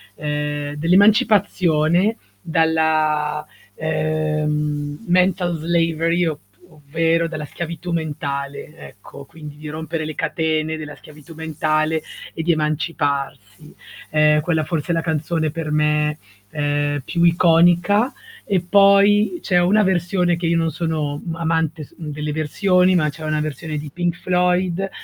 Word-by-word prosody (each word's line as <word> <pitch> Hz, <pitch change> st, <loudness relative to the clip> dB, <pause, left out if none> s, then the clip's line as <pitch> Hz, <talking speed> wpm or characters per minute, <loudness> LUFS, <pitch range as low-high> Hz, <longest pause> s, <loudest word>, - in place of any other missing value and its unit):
ehm, 150 Hz, 0 st, -3 dB
dell'emancipazione, 185 Hz, -, +3 dB, 0.2 s
dalla, 155 Hz, -, +1 dB, 0.3 s
ehm, 150 Hz, -1 st, -2 dB
mental 180 Hz, -1 st, +2 dB
slavery 165 Hz, +1 st, +1 dB
op 155 Hz, -3 st, -2 dB, 0.3 s
ovvero 165 Hz, +3 st, 0 dB
dalla 155 Hz, -2 st, -5 dB
schiavitù 170 Hz, +3 st, -6 dB
mentale, 145 Hz, -3 st, -4 dB
ecco, 140 Hz, 0 st, -12 dB
quindi 150 Hz, 0 st, -11 dB
di 150 Hz, +1 st, -9 dB
rompere 155 Hz, +1 st, -4 dB
le 155 Hz, -1 st, -6 dB
catene 160 Hz, -1 st, -1 dB
della 150 Hz, -1 st, -8 dB
schiavitù 150 Hz, +1 st, -15 dB
mentale 155 Hz, 0 st, -1 dB, 0.3 s
e 160 Hz, -, -4 dB
di 170 Hz, +1 st, +3 dB
emanciparsi. 145 Hz, -5 st, -3 dB, 0.3 s
Ehm, 150 Hz, 0 st, +4 dB
quella 160 Hz, 0 st, 0 dB
forse 160 Hz, +1 st, -3 dB
è -, -, +2 dB
la 165 Hz, -, 0 dB
canzone 160 Hz, 0 st, -1 dB
per 165 Hz, -1 st, -5 dB
me, 150 Hz, 0 st, +1 dB, 0.3 s
ehm, 145 Hz, -1 st, -1 dB
più 170 Hz, +5 st, -1 dB
iconica, 175 Hz, +6 st, +4 dB, 0.3 s
e 195 Hz, -2 st, +1 dB
poi 200 Hz, -, +4 dB
c'è 180 Hz, -3 st, +2 dB
una 205 Hz, +5 st, +3 dB
versione 180 Hz, -1 st, +1 dB
che 170 Hz, +1 st, -5 dB
io 165 Hz, 0 st, +2 dB
non 165 Hz, -1 st, 0 dB
sono, 155 Hz, -2 st, -3 dB
mhmm, 165 Hz, -2 st, -4 dB
amante 160 Hz, -1 st, -1 dB
s -, -, -23 dB
delle 150 Hz, -1 st, -5 dB
versioni, 180 Hz, +4 st, +2 dB
ma 155 Hz, -4 st, +2 dB
c'è 155 Hz, +2 st, -9 dB
una 155 Hz, 0 st, -1 dB
versione 155 Hz, +1 st, -4 dB
di 150 Hz, 0 st, -6 dB
Pink 175 Hz, -1 st, -1 dB
Floyd, 180 Hz, +1 st, 0 dB
160 Hz, 130 wpm, -20 LUFS, 150-175 Hz, 0.3 s, Ehm